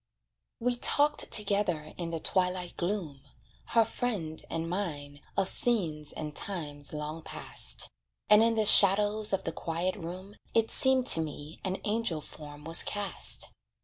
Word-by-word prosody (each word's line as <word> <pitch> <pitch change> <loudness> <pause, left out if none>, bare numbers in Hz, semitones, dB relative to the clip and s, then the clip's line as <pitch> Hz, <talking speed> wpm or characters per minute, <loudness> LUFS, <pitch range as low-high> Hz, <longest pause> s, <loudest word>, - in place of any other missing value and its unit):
We 245 +1 0
talked 290 +4 +3
together 200 -7 0
in 170 -2 -5
the 165 -1 -4
twilight 180 0 +1
gloom, 175 -7 -3 0.5
Her 230 -1 +3
friend 180 -13 -3
and 165 0 -3
mine 150 -6 -5 0.2
of 195 - +2
scenes 165 -13 +1
and 150 -1 -7
times 145 -7 -3
long 150 +1 -5
past; - - -2 0.4
And 210 +1 +7
in 230 0 +3
the 220 -1 +1
shadows 210 +2 +6
of 195 -1 -1
the 165 - -3
quiet 170 +3 -3
room, 185 +2 -9 0.2
It 225 -1 +2
seemed 265 -1 +4
to 165 - 0
me 150 0 -7
an 190 0 -2
angel 210 -6 -1
form 150 -1 -12
was 165 +2 +4
cast. 205 -2 -1
180 Hz, 145 wpm, -29 LUFS, 155-210 Hz, 0.5 s, And